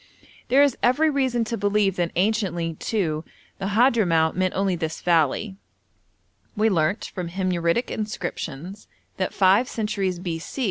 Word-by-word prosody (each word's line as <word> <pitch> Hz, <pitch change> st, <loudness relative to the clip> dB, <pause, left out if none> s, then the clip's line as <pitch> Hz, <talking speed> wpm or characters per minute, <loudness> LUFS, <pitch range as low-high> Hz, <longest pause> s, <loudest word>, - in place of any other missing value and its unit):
There 270 Hz, +3 st, +5 dB
is 280 Hz, -4 st, +2 dB
every 300 Hz, +6 st, +3 dB
reason 260 Hz, -4 st, +1 dB
to 230 Hz, +1 st, -3 dB
believe 205 Hz, -1 st, +1 dB
that 175 Hz, -1 st, 0 dB
anciently, 185 Hz, -4 st, 0 dB
too, 160 Hz, -4 st, -2 dB, 0.4 s
the 195 Hz, -, -2 dB
Hadhramout 205 Hz, -8 st, +3 dB
meant 185 Hz, 0 st, 0 dB
only 195 Hz, -1 st, +1 dB
this 160 Hz, -2 st, -4 dB
valley; 175 Hz, +4 st, +1 dB, 1.0 s
we 220 Hz, +1 st, +3 dB
learnt 170 Hz, +3 st, +1 dB
from 180 Hz, -3 st, -4 dB
Himyaritic 180 Hz, +3 st, 0 dB
inscriptions 195 Hz, -, -5 dB, 0.3 s
that 185 Hz, -, -1 dB
five 200 Hz, +6 st, +3 dB
centuries 200 Hz, -4 st, -2 dB
b.c. 170 Hz, +6 st, -5 dB
195 Hz, 135 wpm, -24 LUFS, 170-220 Hz, 1.0 s, There